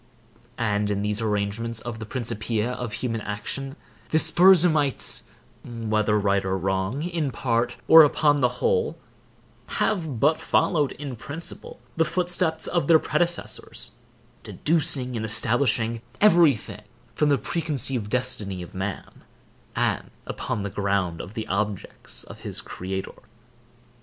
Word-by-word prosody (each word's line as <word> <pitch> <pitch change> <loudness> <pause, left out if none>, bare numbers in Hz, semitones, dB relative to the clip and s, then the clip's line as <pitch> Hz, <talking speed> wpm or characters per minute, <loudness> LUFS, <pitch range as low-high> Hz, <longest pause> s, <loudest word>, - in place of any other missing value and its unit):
And 105 -3 0
in 100 0 -1
these 105 +1 0
arrangements 110 +2 -1
of 120 -2 -6
the 110 - -7
Principia 115 -1 -2
of 125 -2 -5
human 115 -2 -3
action, 135 +7 -4 0.3
the 160 - +2
Spurzheimites, 160 -4 +4 0.4
whether 110 -3 0
right 100 -1 +1
or 95 0 -1
wrong, 95 - -1
in 170 -4 -2
part, 120 -1 -1
or 160 - +10
upon 145 -1 +3
the 125 - +5
whole, 465 -1 0 0.8
have 160 - -1
but 150 +5 +2
followed, 150 -6 +1
in 140 -2 -7
principle, 145 +8 -7 0.2
the 165 - +4
footsteps 175 -1 +1
of 170 -5 0
their 165 - +7
predecessors; 170 +3 -2 0.5
deducing 150 -6 +1
and 110 - -3
establishing 115 +1 +1 0.2
every 170 -9 +6
thing 105 -1 -10 0.3
from 150 - +1
the 140 - +4
preconceived 135 -5 -1
destiny 115 -7 -2
of 85 - -12
man, 95 +1 -6 0.5
and - - -1 0.2
upon 100 - -4
the 100 - -4
ground 100 -5 -1
of 105 - -10
the 110 - -3
objects 100 0 -4
of - - -12
his - - -4
Creator. 95 +1 -6
120 Hz, 130 wpm, -24 LUFS, 105-150 Hz, 0.8 s, or